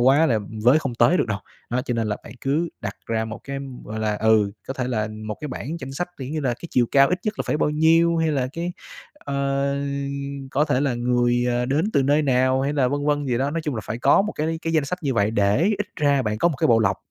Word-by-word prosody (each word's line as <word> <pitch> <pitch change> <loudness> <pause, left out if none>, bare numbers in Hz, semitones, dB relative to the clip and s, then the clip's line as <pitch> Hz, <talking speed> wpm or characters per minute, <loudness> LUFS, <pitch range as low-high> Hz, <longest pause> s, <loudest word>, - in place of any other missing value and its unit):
quá 135 +6 +5
là 115 -6 +2 0.3
với 130 +6 +6
không 135 -5 -4
tới 120 +8 +4
được - - +1
đâu. 100 - -1 0.3
Đó, 125 +1 0
cho 125 -2 -2
nên 115 -1 0
là 105 - -1
bạn - - -10
cứ 150 +5 0
đặt 100 0 -5
ra 110 -1 -1
một 110 0 -7
cái, 140 0 -4 0.3
gọi 110 +1 -6
là, 105 -1 0
ừ, 110 -2 +3 0.2
có 135 - -3
thể 125 -2 -2
là 110 -4 -1 0.2
một 105 - -4
cái 150 - -5
bảng 145 +4 -5
danh 135 0 -6
sách 175 +6 -3
kiểu 130 -1 -5
như 155 +1 -2
là 130 -4 0
cái 170 - -10
chiều 120 -1 +3
cao 135 0 +6
ít 180 - 0
nhất 215 -1 -2
là - - 0
phải - - +1
bao 150 - +1
nhiêu, 165 +2 +4
hay 160 -1 +1
là, 135 -4 0
cái, 170 +2 -3 0.4
ờ, 140 - -1 0.7
có 145 +3 +2
thể 145 -4 +1
là 140 -3 +1
người, 120 0 +1
ờ, 120 0 0
đến 155 - +1
từ 140 - +3
nơi 145 +3 +3
nào, 130 -1 +2
hay 140 +1 0
là 135 -4 +2
vân 145 +2 -2
vân 145 -1 +1
gì 120 -2 0
đó, 135 +2 0
nói 165 +2 -2
chung 150 -3 -2
là 110 - -3
phải 115 - -4
có 135 - +4
một 210 - -3
cái 160 +2 -2
cái 165 - -2
danh 155 -3 +2
sách 180 +6 -3
như 135 -3 0
vậy 105 -1 +2
để 105 +4 +2 0.2
ít 210 - -2
ra 145 -4 +2
bạn 105 -2 -2
có 170 - +4
một 155 - -3
cái - - +2
bộ 115 -2 +5
lọc. 110 - +2
135 Hz, 280 wpm, -23 LUFS, 120-150 Hz, 0.7 s, với